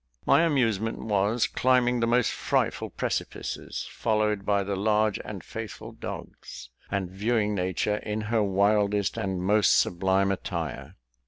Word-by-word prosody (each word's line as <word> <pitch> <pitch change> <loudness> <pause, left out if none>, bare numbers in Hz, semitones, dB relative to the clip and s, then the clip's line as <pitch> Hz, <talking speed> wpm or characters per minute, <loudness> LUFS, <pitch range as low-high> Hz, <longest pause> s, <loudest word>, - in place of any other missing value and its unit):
My - - +5
amusement 115 - +1
was 105 +2 +1
climbing 125 -1 +2
the 115 - +1
most 120 -1 +3
frightful - - -1
precipices, - - -4
followed 105 -2 0
by 100 -1 +2
the 100 0 -2
large 105 +1 +1
and - - -7
faithful - - -7
dogs, - - -9 0.2
and 95 -3 -2
viewing 105 +2 0
nature 95 +2 0
in 105 0 -3
her 110 +1 0
wildest 100 0 +2
and 95 -2 -2
most 105 -1 +4
sublime 95 +2 +2
attire. 85 -6 -4
105 Hz, 135 wpm, -27 LUFS, 95-110 Hz, 0.2 s, My